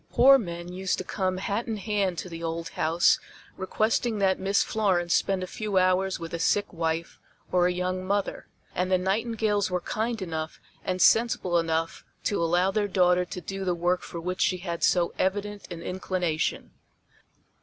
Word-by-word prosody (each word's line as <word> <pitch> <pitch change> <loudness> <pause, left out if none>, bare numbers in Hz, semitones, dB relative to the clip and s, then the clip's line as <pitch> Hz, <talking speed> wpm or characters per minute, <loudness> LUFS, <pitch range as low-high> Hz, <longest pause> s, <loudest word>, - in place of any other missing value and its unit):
Poor 270 +2 +7
men 175 -3 -6
used 190 0 -1
to - - -3
come 185 -2 -1
hat 200 +4 -2
in 225 -2 -2
hand 200 -3 -1
to - - -4
the 165 -2 -8
old 165 0 -3
house 165 +2 +3 0.4
requesting 215 +4 0
that 190 -2 +2
Miss 195 +1 +2
Florence 185 -6 +1
spend 190 -1 +1
a - - -2
few 205 +1 -3
hours 185 0 +2
with 165 0 -7
a 170 - -2
sick 205 +4 +1
wife 165 0 -2 0.3
or 180 -1 +4
a - - +1
young 185 +1 -2
mother, 200 +1 -2 0.3
and 180 +1 -1
the 185 - +5
Nightingales 210 +1 0
were 180 -1 0
kind 220 +5 -2
enough 160 -4 -4 0.2
and 185 -1 +1
sensible 220 -6 +3
enough 165 0 -1 0.2
to 205 - 0
allow 175 +3 +2
their 210 0 0
daughter 180 -2 +3
to 180 - -7
do 195 +3 -5
the 180 -2 0
work 175 +1 +1
for 170 - -7
which 180 +2 -3
she 185 - +2
had 170 -2 -5
so 175 -2 +3
evident 205 +1 -1
an 170 -1 -6
inclination. 180 -3 -2
185 Hz, 180 wpm, -27 LUFS, 175-200 Hz, 0.4 s, Poor